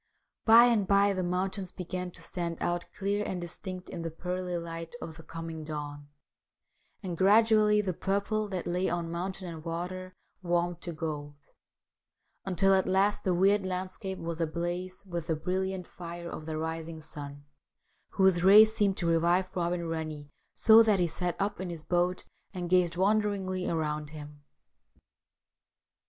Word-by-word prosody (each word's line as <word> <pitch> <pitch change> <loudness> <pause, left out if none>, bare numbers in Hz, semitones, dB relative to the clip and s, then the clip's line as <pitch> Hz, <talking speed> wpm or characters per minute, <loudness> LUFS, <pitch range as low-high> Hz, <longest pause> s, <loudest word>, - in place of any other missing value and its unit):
By 230 +1 +9
and 225 -5 +2
by 200 +1 +4
the 185 - -1
mountains 185 +1 -1
began 180 0 -5
to - - -10
stand 170 -2 -3
out 175 0 -1
clear 205 +1 -1
and 185 -3 -3
distinct 180 +1 -7
in 170 - -6
the 165 - -3
pearly 180 +2 -3
light 165 +2 -6
of 160 - -7
the 165 - -11
coming 165 -1 -7
dawn; 145 -1 -6 1.0
and 180 -3 -3
gradually 210 +2 +5
the 190 -3 -2
purple 200 +4 -1
that 185 -3 -4
lay 180 +2 0
on 170 -1 -2
mountain 185 +2 -4
and 165 -2 -7
water 180 +2 -5 0.3
warmed 175 -1 0
to 175 - -5
gold, 150 -3 -5 1.1
until 195 +1 +3
at 190 0 +3
last 195 +2 +2
the 185 -2 +1
weird 195 +3 +4
landscape 185 +1 -4
was 170 -1 -4
ablaze 175 +4 -3
with 170 -3 -5
the 160 - +1
brilliant 185 +3 -2
fire 170 0 -8
of 155 - -7
the 155 -1 -3
rising 160 0 -4
sun, 145 -2 -9 0.7
whose 190 -2 +3
rays 215 +3 +8
seemed 200 -3 +2
to 175 - -2
revive 175 +3 +2
Robin 175 -1 -1
Rennie, 155 -3 -5 0.2
so 220 0 +7
that 215 -3 +4
he 175 - +3
sat 175 +2 -2
up 200 0 -1
in 185 - -4
his 165 -3 -7
boat 175 +2 0 0.3
and 175 -1 -4
gazed 175 -2 +3
wonderingly 195 -2 +1
around 150 -2 -2
him. 150 -1 -10
180 Hz, 160 wpm, -29 LUFS, 165-190 Hz, 1.1 s, By